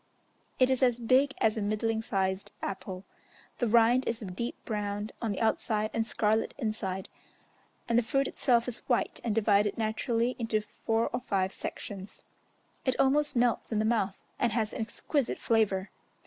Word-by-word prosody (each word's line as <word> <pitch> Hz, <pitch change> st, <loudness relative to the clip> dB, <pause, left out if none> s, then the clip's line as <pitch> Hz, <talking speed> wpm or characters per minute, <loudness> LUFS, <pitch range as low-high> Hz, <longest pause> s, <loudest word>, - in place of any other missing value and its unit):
It 255 Hz, 0 st, +4 dB
is 260 Hz, -, +1 dB
as 245 Hz, -2 st, +4 dB
big 260 Hz, +4 st, +3 dB
as 220 Hz, 0 st, +2 dB
a -, -, -1 dB
middling 220 Hz, +2 st, 0 dB
sized 190 Hz, -3 st, -1 dB
apple. 190 Hz, -1 st, -5 dB, 0.5 s
The 240 Hz, -, +2 dB
rind 235 Hz, +3 st, +4 dB
is 230 Hz, -, -1 dB
a 215 Hz, -, -7 dB
deep 195 Hz, +6 st, -4 dB
brown 205 Hz, -1 st, -3 dB
on 225 Hz, -3 st, -1 dB
the 200 Hz, -, -3 dB
outside 220 Hz, -1 st, +1 dB
and 225 Hz, 0 st, 0 dB
scarlet 215 Hz, 0 st, +1 dB
inside, 210 Hz, -6 st, -3 dB, 0.8 s
and 235 Hz, 0 st, +4 dB
the -, -, +3 dB
fruit 275 Hz, +4 st, +1 dB
itself 240 Hz, -3 st, +2 dB
is 245 Hz, -2 st, -1 dB
white, 240 Hz, -, +1 dB
and 225 Hz, -3 st, 0 dB
divided 205 Hz, -2 st, +3 dB
naturally 230 Hz, +2 st, 0 dB
into 225 Hz, -2 st, +1 dB
four 225 Hz, +2 st, -1 dB
or 245 Hz, -, 0 dB
five 195 Hz, -5 st, 0 dB
sections: 195 Hz, 0 st, -7 dB, 0.6 s
it 260 Hz, -2 st, +1 dB
almost 290 Hz, +1 st, +3 dB
melts 240 Hz, -1 st, +1 dB
in 220 Hz, -, 0 dB
the 215 Hz, -, +2 dB
mouth, 215 Hz, -4 st, +1 dB, 0.2 s
and 235 Hz, -3 st, +2 dB
has 220 Hz, -2 st, 0 dB
an -, -, -3 dB
exquisite 245 Hz, +5 st, -1 dB
flavour. 205 Hz, -4 st, +1 dB
225 Hz, 170 wpm, -30 LUFS, 210-240 Hz, 0.8 s, It